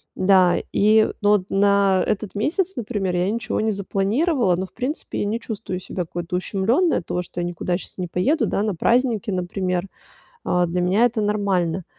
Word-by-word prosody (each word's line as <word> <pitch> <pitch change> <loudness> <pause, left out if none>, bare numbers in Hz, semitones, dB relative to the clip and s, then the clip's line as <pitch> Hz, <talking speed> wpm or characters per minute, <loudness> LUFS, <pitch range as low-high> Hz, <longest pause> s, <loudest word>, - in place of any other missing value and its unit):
Да, 185 -2 +4 0.2
и 215 +2 +4
ну 205 - +3
вот, 205 -3 +3
на 200 -1 +3
этот 210 -1 -2
месяц, 350 - 0
например, 205 -6 -2
я 180 +2 +1
ничего 230 -1 -2
не 220 - +1
запланировала, 200 - +1
но, 185 - -3
в - - -18
принципе, 260 +6 -4
я - - 0
не 215 +3 -1
чувствую 215 -5 -5
себя 185 0 -4
какой-то 170 +1 -5
ущемлённой 225 - +1
от 170 - -5
того, 180 - -2
что 175 0 -8
я - - -1
никуда 175 0 -2
щас - - -11
не 180 -1 -3
поеду, 230 - +1
да, 200 - 0
на 210 -3 -1
праздники, 235 +3 +1
например. 180 0 -2 0.6
А, 180 0 +2
для 180 +1 -2
меня 195 +7 +3
это 235 -2 -1
нормально. 190 -4 0
200 Hz, 190 wpm, -22 LUFS, 180-220 Hz, 0.6 s, Да